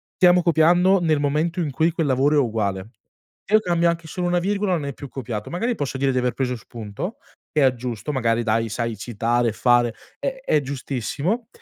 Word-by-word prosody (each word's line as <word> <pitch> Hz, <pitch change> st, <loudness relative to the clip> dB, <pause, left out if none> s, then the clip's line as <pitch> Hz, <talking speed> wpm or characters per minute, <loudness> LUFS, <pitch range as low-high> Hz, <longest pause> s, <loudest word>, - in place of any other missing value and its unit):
stiamo 180 Hz, -1 st, +5 dB
copiando 175 Hz, +3 st, +4 dB
nel 155 Hz, -3 st, +2 dB
momento 150 Hz, +5 st, 0 dB
in 160 Hz, -4 st, 0 dB
cui 160 Hz, +5 st, +2 dB
quel 160 Hz, -2 st, -1 dB
lavoro 140 Hz, +3 st, +3 dB
è -, -, +6 dB
uguale. 105 Hz, -5 st, -1 dB, 0.6 s
Io 215 Hz, -, +7 dB
cambio 170 Hz, -4 st, +2 dB
anche 170 Hz, -1 st, -3 dB
solo 180 Hz, +2 st, -3 dB
una 175 Hz, 0 st, +2 dB
virgola, 200 Hz, +2 st, 0 dB
non 160 Hz, -5 st, -1 dB
è 140 Hz, -, -4 dB
più 140 Hz, -, -9 dB
copiato. 115 Hz, -6 st, -5 dB
Magari 230 Hz, +8 st, -1 dB
posso 140 Hz, -5 st, -3 dB
dire 135 Hz, 0 st, +1 dB
di -, -, -1 dB
aver 125 Hz, 0 st, +1 dB
preso 125 Hz, -2 st, -1 dB
spunto, 115 Hz, -, -7 dB, 0.3 s
e 150 Hz, -, +1 dB
aggiusto 125 Hz, -2 st, 0 dB
magari 115 Hz, -3 st, +1 dB
dai, 115 Hz, 0 st, 0 dB
sai 115 Hz, 0 st, -3 dB
citare, 120 Hz, +2 st, 0 dB
e -, -, -4 dB
fare 120 Hz, 0 st, +3 dB, 0.3 s
è 265 Hz, -1 st, -3 dB
è 150 Hz, -, +3 dB
giustissimo. 140 Hz, -, -3 dB
140 Hz, 195 wpm, -22 LUFS, 120-170 Hz, 0.6 s, Io